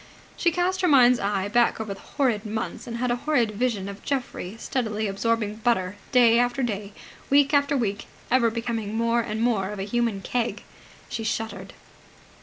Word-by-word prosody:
She 345 - +2
cast 360 +2 0
her 365 - +3
mind's 250 -5 +6
eye 200 -1 -1
back 235 +3 +2
over 215 -2 -3
the 195 - -13
horrid 240 -7 -1
months 220 +2 -4
and 235 -1 -4
had 245 0 0
a 240 - +1
horrid 245 -5 +1
vision 215 -3 -1
of 200 0 -8
Geoffrey 245 -7 -3
steadily 220 -3 -2
absorbing 215 +1 -1
butter, 205 -5 0 0.2
day 240 -3 +6
after 245 +2 +1
day, 205 -3 -3 0.4
week 280 +1 +4
after 285 0 +3
week 205 -5 -2 0.2
ever 240 -2 +4
becoming 225 -2 -3
more 230 +1 +2
and 215 -1 -4
more 210 -6 +1
of 210 - -6
a 195 - -3
human 225 -1 -1
keg. 240 +3 -2 0.4
She 225 - -4
shuddered. 225 0 -4
230 Hz, 180 wpm, -25 LUFS, 210-245 Hz, 0.4 s, mind's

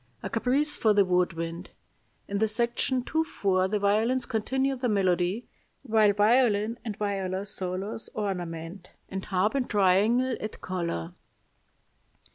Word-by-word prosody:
A - - -4
caprice 270 +6 +1
for 215 -2 +3
the 200 -1 +4
wood 180 -1 +2
wind. 165 +2 -5 0.6
In 200 0 -2
the 220 - +3
section 240 +3 +1
2 320 +5 0
4 190 -10 0
the 210 +2 0
violins 220 +6 +1
continue 265 +5 0
the 250 -1 -1
melody, 185 +1 +1 0.4
while 220 -4 +4
violin 215 +1 +3
and 215 -3 -5
viola 195 -2 -2
solos 195 +3 -5
ornament, 180 -3 -4 0.2
and 190 0 -4
harp 190 +2 +1
and 270 -3 -1
triangle 210 +6 +3
add 215 - -6
color. 170 - -3
205 Hz, 135 wpm, -27 LUFS, 185-235 Hz, 0.6 s, the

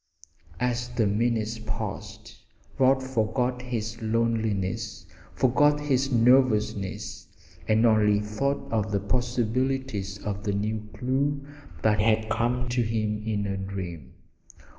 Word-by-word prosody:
As 125 0 -1
the 115 - +3
minutes 110 +1 0
passed 110 - -6 0.4
Rod 130 0 +4
forgot 125 0 0
his 115 -2 -4
loneliness, 110 -2 -1 0.3
forgot 145 +4 +4
his 135 -2 +1
nervousness 115 -5 +2 0.4
and 110 +1 +4
only 105 -2 +4
thought 110 +7 -2
of 110 -2 0
the 100 - +1
possibilities 120 -1 -1
of 100 -1 -3
the 100 -1 0
new 105 +1 -2
clue 140 +4 0 0.4
that 105 -1 +3
had 110 0 +2
come 120 +3 0
to 120 0 +1
him 110 -2 -1
in 105 -2 0
a 100 -1 -2
dream. 90 -8 -6
110 Hz, 120 wpm, -27 LUFS, 105-125 Hz, 0.4 s, Rod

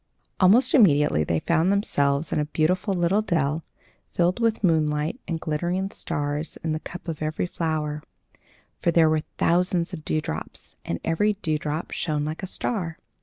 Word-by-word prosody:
Almost 205 +8 +5
immediately 150 - +5
they 80 +1 0
found 170 +3 +2
themselves 145 -7 +1
in - - +1
a 150 - +1
beautiful 180 +6 0
little 180 +4 +2
dell, 160 -5 0 0.5
filled 180 +4 +1
with 230 -2 +1
moonlight, 155 - +1
and 170 - -1
with 165 - -6
glittering 175 +5 -1
stars 145 -1 -3
in 160 - -1
the 155 - -1
cup 175 +3 -9
of 160 -2 -4
every 155 +2 -1
flower; 155 -3 -2 0.8
for - - +2
there 165 -2 +5
were 155 -1 +2 0.2
thousands 180 +1 +1
of 155 -3 -6
dewdrops, 155 - -4
and 85 - -3
every 205 +6 +2
dewdrop 155 0 -2
shone 150 -3 -1
like 155 +1 -4
a 190 - -4
star. 180 -5 -3
165 Hz, 165 wpm, -25 LUFS, 150-180 Hz, 0.8 s, Almost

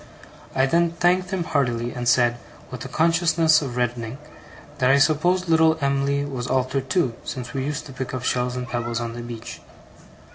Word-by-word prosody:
I 130 - +4
then 170 +4 +2
thanked 180 +2 +2
him 190 -3 -1
heartily; 120 -6 0
and 120 -1 -4
said, 120 -1 +3 0.3
with 125 -2 -6
a - - -6
consciousness 165 +2 +3
of 130 -4 -5
reddening, 120 0 -2 0.6
that 125 -1 +3
I 135 - +6
supposed 165 +6 +2
little 160 -1 +4
Em'ly 140 0 0
was 130 -4 -4
altered 130 +1 -1
too, 175 -10 +1
since 125 -2 -6
we 135 - -2
used 150 +1 -3
to 140 - -10
pick 130 -1 -5
up 130 -1 -4
shells 125 -1 0
and 125 0 -4
pebbles 120 -1 -2
on 115 -1 -4
the 120 - -6
beach? 120 -1 -8
135 Hz, 185 wpm, -23 LUFS, 120-160 Hz, 0.6 s, I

